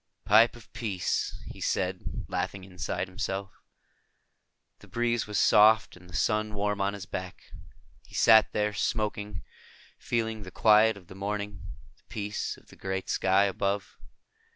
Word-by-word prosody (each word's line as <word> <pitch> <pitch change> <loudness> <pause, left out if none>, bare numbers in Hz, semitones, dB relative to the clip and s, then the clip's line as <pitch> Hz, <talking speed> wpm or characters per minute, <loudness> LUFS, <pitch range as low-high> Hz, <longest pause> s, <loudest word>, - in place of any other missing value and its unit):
"Pipe 110 +4 +6
of 120 -2 -16
peace," 100 -7 -2
he - - -10
said, - - -2
laughing 95 -1 -3
inside 95 0 -4
himself. 95 +1 -4 1.3
The - - -16
breeze 120 -1 0
was 105 -1 -2
soft 110 +2 +5
and 90 0 -16
the 90 - -10
sun 105 +6 0
warm 105 0 -1
on 100 +1 0
his 100 -2 -7
back. 90 -1 -7 0.6
He - - -13
sat 110 -1 +6
there, 105 0 0
smoking, 105 -4 -2 0.6
feeling 115 -2 -2
the 95 - -8
quiet 110 +2 +5
of 95 - -14
the 90 - -12
morning, 100 0 -4 0.3
the - - -32
peace 105 0 -3
of - - -21
the - - -14
great 95 0 -4
sky 95 +1 +3
above. 100 0 -2
105 Hz, 150 wpm, -28 LUFS, 95-110 Hz, 1.3 s, Pipe